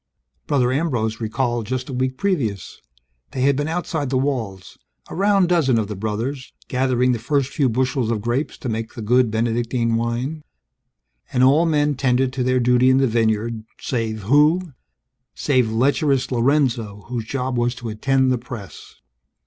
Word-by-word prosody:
_ - - -48
Brother 130 -4 +2
Ambrose 120 -7 -1
recalled 120 0 -1
just 130 0 -3
a 135 - -6
week 130 +1 -1
previous; 120 - -2 0.5
they 130 - -2
had 140 +1 +3
been 145 +2 -1
outside 160 -4 -2
the 130 - +1
walls, 120 -9 -3 0.3
a - - -8
round 195 -1 +3
dozen 150 -9 +3
of 110 -2 -1
the 105 - -4
brothers, 115 +7 -4
gathering 125 -1 +1
the 120 - -1
first 140 +2 0
few 140 -4 +2
bushels 125 0 0
of 115 -2 0
grapes 120 +7 -2
to - - -7
make 115 -1 -4
the 115 - -6
good 125 +2 +3
Benedictine 115 +1 0
wine. 120 +7 -2 0.9
And 125 - +2
all 150 +6 +5
men 150 -2 +2
tended 130 -1 +1
to 130 -2 -1
their 130 0 +2
duty 125 +1 +4
in 130 - +4
the 135 - +3
vineyard 110 -1 0 0.2
save 110 -4 -3
who? 150 - +3 0.6
Save 130 -6 +1
lecherous 135 +3 +1
Lorenzo, 120 -5 +1
whose 120 -2 -4
job 130 +1 -3
was 120 0 0
to 120 -1 -6
attend 130 +4 +1
the 125 - 0
press. 120 -5 -10
125 Hz, 170 wpm, -21 LUFS, 115-135 Hz, 0.9 s, all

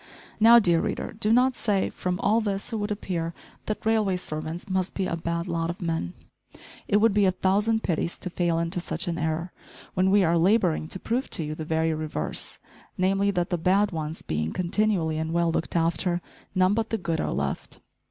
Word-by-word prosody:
Now, 230 +2 +8
dear 175 -7 +4
reader, - - -3
do 215 -1 0
not 250 +2 +4
say, 200 -4 0
"From 180 0 -3
all 225 +2 +3
this 200 +1 -2
it - - 0
would 205 0 -2
appear 170 -5 -3 0.3
that 215 - -3
railway 215 -4 +2
servants 160 +1 -5
must 190 -1 -1
be 195 - 0
a 170 - -1
bad 170 0 -3
lot 165 0 -1
of 175 - -4
men!" 165 - -2 0.7
It 205 - +3
would 215 0 +4
be 205 -1 +4
a 185 - +4
thousand 210 +5 +1
pities 170 -1 -1
to 180 - -6
fail 170 -2 0
into 170 +2 -1
such 180 - -4
an 170 0 -2
error, 160 +2 -2 0.4
when 185 +1 +2
we 200 0 +5
are 170 0 +3
labouring 180 -4 +2
to 190 - -6
prove 245 +7 -2
to 165 - +1
you 150 0 -4
the 155 0 -6
very 160 0 +1
reverse, 155 - -4 0.4
namely, 195 +2 +2
that 180 -3 -1
the 175 - 0
bad 195 +5 +3
ones 160 -1 -4
being 75 +1 -2
continually 180 -3 0
and 160 +1 -2
well 170 -1 +2
"looked 165 - -2
after," 170 +1 +1 0.4
none 185 +1 +4
but 225 0 -1
the 225 - 0
good 170 -4 -2
are - - -2
left. - - -3
180 Hz, 205 wpm, -26 LUFS, 165-205 Hz, 0.7 s, Now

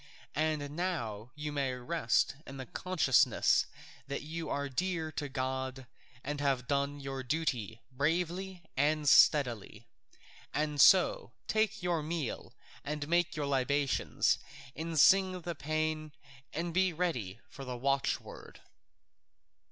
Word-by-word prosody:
And 150 -1 -1
now 120 - -3
you 150 0 -4
may 140 -3 -1
rest 125 -1 0
in 135 - -8
the 130 - -6
consciousness 160 -3 +2 0.4
that 140 0 -4
you 165 +2 -5
are 140 0 -1
dear 165 +3 -2
to 145 -1 -4
God 130 0 -3 0.4
and 145 +1 -3
have 135 -3 0
done 140 +1 0
your 135 -1 -5
duty 125 -6 -2
bravely 175 +6 -1
and 150 +2 +1
steadily, 120 -7 +4 0.7
and 150 -1 +1
so - - +5
take 220 -2 0
your 175 -3 +1
meal 155 -3 -4 0.3
and 150 0 -4
make 175 +2 +1
your 150 -1 -2
libations 140 0 +1 0.4
and 160 0 -2
sing 185 +2 +5
the 170 +1 -4
paean 155 +1 -2 0.4
and 170 +1 -3
be 185 +1 +3
ready 125 - -2
for 135 - -10
the 125 -2 -5
watchword." 135 +2 -2
150 Hz, 125 wpm, -32 LUFS, 135-165 Hz, 0.7 s, so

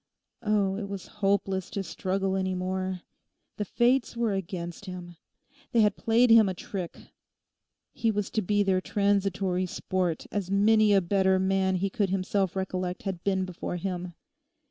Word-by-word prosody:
Oh, 205 -3 +1
it 200 -2 -5
was 200 -3 -5 0.2
hopeless 195 -2 +1
to 200 - -3
struggle 190 0 -1
any 190 -1 -1
more! 185 0 -2 0.6
The 210 - -2
fates 240 +4 +1
were 230 -3 +1
against 180 -1 -5
him. 180 -2 -8 0.6
They 230 - +5
had 210 0 +3
played 230 +1 +3
him 225 -3 +7
a 185 - -3
trick. 180 -1 -6 1.0
He 230 - 0
was 210 -2 -1
to 220 - 0
be 205 +1 +2
their 190 -2 +2
transitory 195 -2 0
sport, 180 -2 -2
as 200 -3 -2
many 210 +2 +4
a 195 -1 +5
better 190 +1 +2
man 190 0 +1
he 195 +2 -1
could 205 -4 0
himself 190 0 0
recollect 185 -1 -3
had 190 -4 -4
been 190 -1 +1
before 180 -1 -5
him. 180 -1 -4
195 Hz, 160 wpm, -28 LUFS, 185-205 Hz, 1.0 s, him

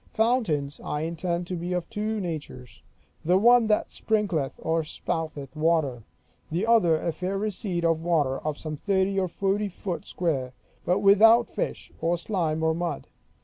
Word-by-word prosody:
Fountains 215 - 0
I 150 - -2
intend 170 +2 -2
to 180 - -4
be 175 +1 -3
of 180 -2 -2
two 215 0 -2
natures: 145 - -6 0.4
the 180 +3 +4
one 235 +2 +5
that 210 -1 +1
sprinkleth 195 -11 -1
or 165 0 +1
spouteth 155 -2 -4
water; 155 -7 +1 0.4
the 175 +6 -1
other 215 -9 +4
a 170 - -1
fair 185 +4 -3
receipt 195 -4 -2
of 165 -1 +1
water, 150 -6 +1
of 150 -1 -3
some 155 -1 -5
thirty 195 +2 +1
or 185 - 0
forty 200 +3 -1
foot 180 -1 -5
square, 135 -8 -2 0.3
but 180 +3 +2
without 220 +4 +6
fish, - - -4
or 170 +1 +1
slime, 165 -4 -1
or 160 0 +3
mud. 170 +1 -4
175 Hz, 160 wpm, -26 LUFS, 160-200 Hz, 0.4 s, without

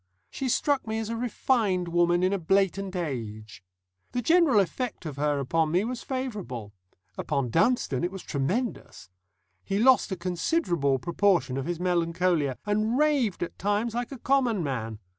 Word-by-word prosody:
She 265 - -3
struck 280 0 +1
me 220 0 -2
as 225 -1 -3
a 230 - -2
refined 225 -5 0
woman 175 +1 +2
in 185 +2 +2
a 200 - 0
blatant 195 +2 +1
age. 110 - -5 0.5
The 245 - 0
general 325 -8 +5
effect 210 +2 -2
of 145 -3 -6
her 145 0 +1
upon 155 +4 +1
me 180 +5 +2
was 245 +2 -4
favourable; 205 - -5 0.5
upon 140 -5 -1
Dunstone 165 - +2
it 175 - +1
was 195 -1 -8
tremendous. 170 - -3 0.5
He 195 - -2
lost 250 0 +4
a - - 0
considerable 170 - 0
proportion 170 -2 +1
of 135 0 -3
his 175 -1 -3
melancholia, 170 -5 +1
and 215 +3 +1
raved 280 -11 +2
at 175 - -7
times 205 +4 0
like 240 +2 -3
a 270 - -6
common 245 -6 +1
man. 115 -6 -3
185 Hz, 160 wpm, -27 LUFS, 155-235 Hz, 0.5 s, general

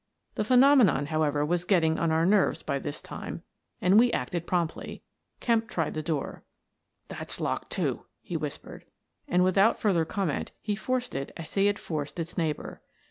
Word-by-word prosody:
The - - -1
phenomenon, 250 - +5
however, 150 -1 +1
was 175 +2 0
getting 165 -4 +2
on 165 - +1
our 160 +1 +2
nerves 200 +1 +3
by 140 -2 -1
this 145 - -5
time - - -7 0.4
and 190 +4 +5
we 240 +1 +4
acted 170 - -2
promptly. 170 -3 -2 0.4
Kemp 230 -2 +1
tried 165 -3 -1
the 155 - -3
door. 155 -3 -3 0.3
" - - -51
That's - - -7
locked, - - -2
too," - - -1
he - - -7
whispered. - - -6 0.4
And, 180 +1 +3
with 185 +1 +2
out 220 +4 +4
further 185 -6 +2
comment, 175 -3 -2
he 210 -1 -2
forced 250 +3 -2
it 135 +1 -4
as 165 -1 -9
he 195 0 +3
had 205 0 +1
forced 150 -4 -5
its 165 0 -5
neighbour. 160 -4 -3
175 Hz, 180 wpm, -28 LUFS, 155-205 Hz, 0.4 s, phenomenon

